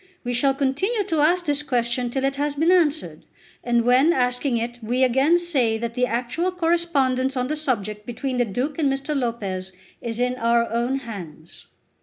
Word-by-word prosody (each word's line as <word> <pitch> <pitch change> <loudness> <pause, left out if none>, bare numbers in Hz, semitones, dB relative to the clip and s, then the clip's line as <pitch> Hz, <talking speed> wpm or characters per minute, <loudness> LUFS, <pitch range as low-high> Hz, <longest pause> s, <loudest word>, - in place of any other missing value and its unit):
We 245 -1 -2
shall 270 +3 +2
continue 300 - 0
to 335 -5 -1
ask 350 +4 +3
this 290 -1 +1
question 245 -2 -1
till 265 +2 -2
it 275 0 0
has 290 0 -1
been 320 +4 +3
answered, 300 - +1 0.4
and 240 -1 +2
when 260 +7 +5
asking 250 -1 0
it 240 +1 -4
we 245 +4 0
again 265 +7 +4
say 270 -11 +1
that 230 +1 -4
the 250 +1 +1
actual 250 +10 -1
correspondence 300 -7 +1
on 250 +1 -1
the 305 - 0
subject 215 -8 -2
between 250 +2 -3
the 245 - +2
Duke 255 - -3
and 285 -3 +2
Mr. 275 +3 -3
Lopez 200 -8 -3 0.3
is 230 -1 -4
in 250 +1 0
our 235 0 +2
own 240 +3 0
hands." 175 - -10
255 Hz, 185 wpm, -23 LUFS, 235-295 Hz, 0.4 s, when